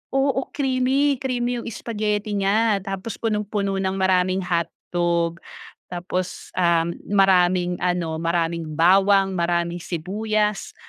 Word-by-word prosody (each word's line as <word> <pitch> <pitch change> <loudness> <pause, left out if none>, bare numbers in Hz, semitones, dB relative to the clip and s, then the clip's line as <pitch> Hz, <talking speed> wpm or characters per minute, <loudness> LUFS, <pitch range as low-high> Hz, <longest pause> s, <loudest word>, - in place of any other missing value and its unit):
oo 270 -1 +2
creamy, 270 +1 +1
creamy 245 -2 -1
yung - - -8
spaghetti 210 -1 -2
niya 205 +2 +2
tapos 195 +2 -5
punong-puno 210 -2 -1
ng 190 0 -1
maraming 185 0 +2
hotdog 170 0 -1 0.5
tapos, 180 +1 -4
um, 170 -2 +2 0.2
maraming 180 -2 +3
ano 175 -3 0
maraming 170 0 -1
bawang, 195 +3 +4
maraming 170 0 0
sibuyas, 210 +5 -2
190 Hz, 105 wpm, -23 LUFS, 175-215 Hz, 0.5 s, bawang